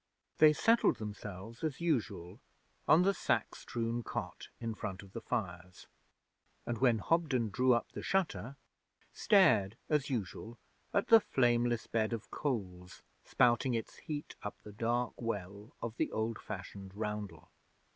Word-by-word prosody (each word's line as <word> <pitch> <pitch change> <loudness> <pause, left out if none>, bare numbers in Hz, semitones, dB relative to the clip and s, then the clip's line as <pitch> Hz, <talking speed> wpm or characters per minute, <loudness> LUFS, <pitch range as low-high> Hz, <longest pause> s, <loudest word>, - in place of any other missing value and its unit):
They 155 -1 +8
settled 225 +9 +3
themselves, 105 - -8
as 155 -4 -2
usual, 115 - -1 0.5
on 165 +3 +6
the 195 +1 +3
sack - - 0
strewn 115 0 -3
cot - - -5
in 115 -1 -3
front 100 -2 -5
of 95 -1 -16
the 115 - -5
fires, 90 -6 -4 0.8
and, 120 -2 -3
when 125 -3 +4
Hobden 130 -4 +1
drew 125 +3 +4
up 120 - -2
the - - -6
shutter, 140 - -1 0.6
stared, 160 - +4
as 150 -2 +1
usual, 115 -1 -4 0.3
at 200 - +1
the 225 - +10
flameless 120 - +1
bed 110 0 0
of 115 -2 -6
coals 90 -10 -4 0.2
spouting 120 +1 +3
its 115 - -4
heat 150 -1 -6
up 105 - -5
the 105 - -9
dark 120 +3 -1
well 100 -2 -4
of 115 0 -4
the - - 0
old 110 +1 -2
fashioned 95 -1 -8
roundel. 105 -6 -5
115 Hz, 145 wpm, -33 LUFS, 105-130 Hz, 0.8 s, the